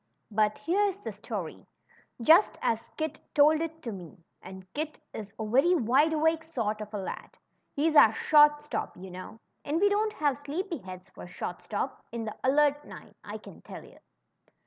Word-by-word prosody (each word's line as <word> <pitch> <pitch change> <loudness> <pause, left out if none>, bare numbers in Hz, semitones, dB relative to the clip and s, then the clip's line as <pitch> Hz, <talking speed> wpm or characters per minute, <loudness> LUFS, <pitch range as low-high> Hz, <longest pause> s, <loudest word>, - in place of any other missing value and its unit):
But 215 0 +2
here's 390 +2 +1
the - - -5
story, - - -7 0.6
just 330 - +6
as 225 0 -1
Kit 315 0 -3 0.2
told 305 +1 +5
it 325 0 -5
to 230 - -4
me; 180 -5 -10 0.2
and 190 0 -10
Kit 305 +1 -4 0.2
is 205 -2 -7
a 220 - -3
very 270 +11 +4
wide 285 +3 +3
awake 320 +1 +2
sort 225 -9 -3
of 210 0 -7
a 210 - -4
lad 190 - -6 0.3
— - - -47
he's 310 +2 +1
our 225 - +8
short 295 +4 +5
stop, 295 - -4
you 185 +1 -9
know, 185 +5 -9 0.2
and 300 +3 -1
we 405 +2 +4
don't 425 +1 +1
have 285 -3 0
sleepy 330 +4 -4
heads 185 -2 -10
for - - -11
short 175 0 -6
stop 250 +5 -4
in 230 -1 -4
the 215 - -5
Alert 290 +2 +3
Nine, - - -12
I - - -6
can - - -14
tell - - -10
you. - - -17
285 Hz, 190 wpm, -29 LUFS, 215-320 Hz, 0.6 s, our